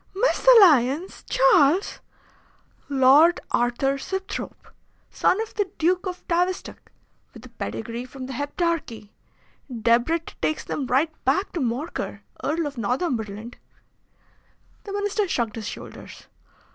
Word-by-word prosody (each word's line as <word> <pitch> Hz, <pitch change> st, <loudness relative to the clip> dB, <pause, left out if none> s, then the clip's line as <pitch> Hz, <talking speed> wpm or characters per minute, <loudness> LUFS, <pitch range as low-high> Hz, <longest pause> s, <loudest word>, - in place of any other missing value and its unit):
"Mesalliance, 375 Hz, -, +4 dB
Charles! 390 Hz, -, +3 dB, 0.9 s
Lord 285 Hz, +6 st, +5 dB
Arthur 255 Hz, +3 st, +1 dB
Sibthorpe, 385 Hz, +6 st, -6 dB, 0.4 s
son 375 Hz, -, +2 dB
of 445 Hz, -, -6 dB
the 410 Hz, -3 st, -1 dB
Duke 360 Hz, +4 st, +1 dB
of 360 Hz, 0 st, -7 dB
Tavistock, 360 Hz, +2 st, -2 dB, 0.4 s
with -, -, -12 dB
a -, -, -12 dB
pedigree 230 Hz, +2 st, -5 dB
from 255 Hz, 0 st, -9 dB
the 265 Hz, -, -7 dB
Heptarchy. 285 Hz, -, -3 dB, 0.6 s
Debrett 240 Hz, +8 st, +1 dB
takes 310 Hz, -, -1 dB
them 275 Hz, -, -4 dB
right 290 Hz, +6 st, +1 dB
back 310 Hz, +10 st, +1 dB
to 345 Hz, -, -4 dB
Morcar, 265 Hz, +5 st, -3 dB, 0.2 s
Earl 330 Hz, +1 st, 0 dB
of 285 Hz, -4 st, -5 dB
Northumberland." 230 Hz, -, -3 dB, 1.3 s
The 400 Hz, -, -6 dB
Minister 410 Hz, 0 st, -1 dB
shrugged 235 Hz, -9 st, -1 dB
his 220 Hz, -2 st, -6 dB
shoulders. -, -, -10 dB
300 Hz, 115 wpm, -24 LUFS, 245-370 Hz, 1.3 s, Lord